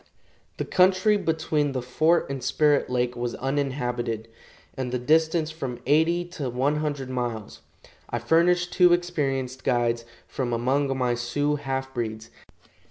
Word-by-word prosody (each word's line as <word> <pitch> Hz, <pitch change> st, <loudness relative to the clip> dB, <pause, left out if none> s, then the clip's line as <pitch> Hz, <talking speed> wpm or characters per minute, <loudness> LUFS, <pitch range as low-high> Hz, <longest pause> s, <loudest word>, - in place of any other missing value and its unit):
The -, -, -2 dB
country 185 Hz, +3 st, +4 dB
between 160 Hz, -6 st, 0 dB
the 130 Hz, -, -2 dB
fort 155 Hz, +7 st, +2 dB
and 135 Hz, -2 st, -5 dB
Spirit 150 Hz, -2 st, +2 dB
lake 125 Hz, -1 st, 0 dB
was 120 Hz, 0 st, -3 dB
uninhabited, 125 Hz, -5 st, -2 dB, 0.5 s
and 130 Hz, -2 st, -3 dB
the 125 Hz, -, 0 dB
distance 160 Hz, +4 st, +2 dB
from 135 Hz, -6 st, -5 dB
eighty 160 Hz, +5 st, +3 dB
to 150 Hz, -7 st, -4 dB
one 135 Hz, +5 st, 0 dB
hundred 145 Hz, -4 st, -3 dB
miles. 120 Hz, -4 st, -4 dB, 0.5 s
I 120 Hz, -, -1 dB
furnished 175 Hz, +8 st, +2 dB
two 180 Hz, -2 st, +6 dB
experienced 135 Hz, -7 st, -1 dB
guides 120 Hz, -2 st, +1 dB, 0.2 s
from 125 Hz, -3 st, -3 dB
among 135 Hz, +3 st, +1 dB
my 125 Hz, -2 st, +1 dB
Sioux 145 Hz, +5 st, -1 dB
half 135 Hz, -1 st, -4 dB
breeds. 110 Hz, -3 st, -4 dB
135 Hz, 140 wpm, -25 LUFS, 125-160 Hz, 0.5 s, two